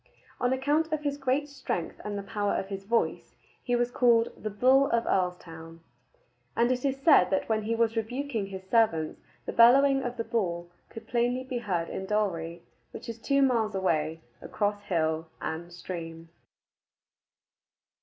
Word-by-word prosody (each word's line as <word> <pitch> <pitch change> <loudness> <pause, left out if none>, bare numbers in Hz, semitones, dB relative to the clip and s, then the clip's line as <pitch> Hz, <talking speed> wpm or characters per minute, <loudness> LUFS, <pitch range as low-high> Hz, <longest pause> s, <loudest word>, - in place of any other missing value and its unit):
On 245 - +1
account 295 +5 +1
of 310 -1 -1
his 285 -1 -2
great 270 +2 0
strength 265 - -4
and 205 -1 -4
the 200 - -4
power 205 0 -1
of 195 - -3
his 195 -1 -6
voice, 230 +3 -1 0.3
he 245 - 0
was 240 0 0
called 235 -2 +4
"the 215 - -5
Bull 260 +6 +4
of 235 0 +2
Earlstoun," 165 -3 -3 0.7
and 235 +2 +3
it 250 0 -1
is 275 -1 0
said 300 - +6
that 190 - 0
when 220 -1 +1
he 225 +2 -1
was 230 0 +1
rebuking 230 -1 -2
his 190 -1 -9
servants 190 -9 +1 0.2
the - - -4
bellowing 270 +4 +6
of 245 -1 -4
the 230 - -1
Bull 175 -7 -2 0.2
could 225 -1 -10
plainly 245 +2 0
be 255 -2 -4
heard 175 -7 -2
in 190 - -5
Dalry, 170 -5 -1 0.3
which - - -10
is 230 0 -6
two 275 +3 +2
miles 225 -6 +1
away 160 -4 0 0.2
across 205 -1 -2
hill 160 -2 0
and 170 +2 -5
stream. 165 -2 -7
220 Hz, 165 wpm, -28 LUFS, 180-250 Hz, 0.7 s, said